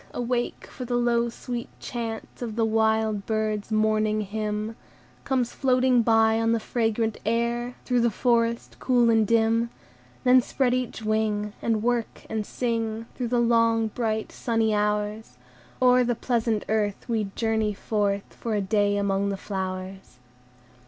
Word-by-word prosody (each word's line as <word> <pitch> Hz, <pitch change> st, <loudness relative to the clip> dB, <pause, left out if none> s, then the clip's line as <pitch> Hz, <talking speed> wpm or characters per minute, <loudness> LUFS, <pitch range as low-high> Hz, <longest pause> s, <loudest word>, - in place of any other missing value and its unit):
awake! 245 Hz, 0 st, -2 dB
for 255 Hz, -, -8 dB
the 245 Hz, 0 st, -2 dB
low, 235 Hz, -1 st, +2 dB
sweet 240 Hz, 0 st, -6 dB
chant 230 Hz, -2 st, -5 dB
Of 225 Hz, -3 st, -4 dB
the 230 Hz, -1 st, +2 dB
wild 220 Hz, -2 st, +1 dB
birds' 215 Hz, -1 st, -1 dB
morning 215 Hz, 0 st, +2 dB
hymn 215 Hz, +1 st, -3 dB, 0.5 s
Comes 255 Hz, -3 st, 0 dB
floating 255 Hz, -2 st, +3 dB
by 225 Hz, -1 st, +4 dB
on 225 Hz, 0 st, +2 dB
the 230 Hz, -, +1 dB
fragrant 225 Hz, -1 st, -1 dB
air, 235 Hz, +2 st, -1 dB
Through 245 Hz, -2 st, +2 dB
the 235 Hz, -, +3 dB
forest 235 Hz, 0 st, 0 dB
cool 245 Hz, -2 st, +3 dB
and 220 Hz, -2 st, +3 dB
dim; 230 Hz, +1 st, +2 dB, 0.5 s
Then 255 Hz, 0 st, +6 dB
spread 250 Hz, 0 st, 0 dB
each 250 Hz, -3 st, -2 dB
wing, 215 Hz, -1 st, 0 dB
And 220 Hz, -2 st, 0 dB
work, 240 Hz, -1 st, -1 dB
and 220 Hz, -2 st, -2 dB
sing, 230 Hz, -2 st, -2 dB
Through 250 Hz, -, -3 dB
the 240 Hz, +1 st, +1 dB
long, 230 Hz, -1 st, +3 dB
bright 220 Hz, -1 st, -2 dB
sunny 225 Hz, -2 st, 0 dB
hours; 210 Hz, +1 st, -1 dB, 0.4 s
O'er 250 Hz, 0 st, +5 dB
the 240 Hz, 0 st, 0 dB
pleasant 230 Hz, -3 st, 0 dB
earth 210 Hz, -1 st, -1 dB
We 225 Hz, -3 st, 0 dB
journey 220 Hz, -2 st, 0 dB
forth, 200 Hz, -1 st, -1 dB
For 225 Hz, -2 st, -3 dB
a -, -, +1 dB
day 205 Hz, +1 st, +1 dB
among 200 Hz, 0 st, 0 dB
the 195 Hz, -, -2 dB
flowers. 190 Hz, -5 st, -5 dB
225 Hz, 150 wpm, -25 LUFS, 215-235 Hz, 0.5 s, Then